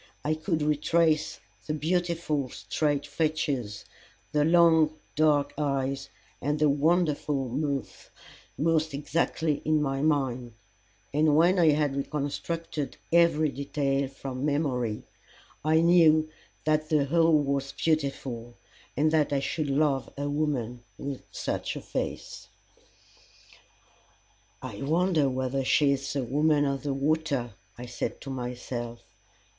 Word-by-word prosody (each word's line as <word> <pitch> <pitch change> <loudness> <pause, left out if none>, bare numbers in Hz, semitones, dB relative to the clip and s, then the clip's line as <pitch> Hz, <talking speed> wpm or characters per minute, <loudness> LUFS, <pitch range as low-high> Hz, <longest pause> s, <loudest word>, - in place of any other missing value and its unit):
I 155 - +2
could 155 0 -1
retrace 155 +1 +1 0.3
the 155 - -1
beautiful 165 -3 -1
straight 140 - -1
features, 145 -8 -2 0.5
the 150 -1 +2
long 160 -1 +4 0.2
dark 150 -2 +3
eyes, 135 -1 -1 0.3
and 145 +2 0
the 150 0 +3
wonderful 150 -3 +1
mouth 140 +1 -3 0.5
most 160 -1 +1
exactly 150 +1 -1
in 155 0 +2
my 135 -2 -1
mind, 130 -6 0 0.6
and 150 0 +3
when 175 +4 +4
I 165 -2 +6
had 145 -2 0
reconstructed 150 +2 -3 0.2
every 165 -3 +4
detail 140 0 -1
from 135 -1 -6
memory 135 -7 -1 0.6
I 160 +1 +4
knew 160 -2 +5 0.3
that 155 0 +1
the 150 -3 +3
whole 165 +1 +4
was 140 -1 -1
beautiful, 135 -6 -2 0.4
and 155 +2 +3
that 155 -2 +2
I 140 - +2
should 140 +2 -2
love 140 -1 +1
a 140 +1 -2
woman 135 -5 -2
with 140 -2 -5
such - - -3
a - - -5
face. - - -5 2.2
"I - - -7
wonder 160 0 +2
whether 130 +1 -1
she 140 +2 +3
is 140 0 -2
the 140 -2 -1
Woman 145 +3 +2
of 140 -1 -1
the 145 -2 -2
Water!" 140 -4 0 0.2
I 120 - -7
said 120 -1 -4
to 135 - -6
myself. 120 -2 -5
145 Hz, 125 wpm, -27 LUFS, 135-155 Hz, 2.2 s, I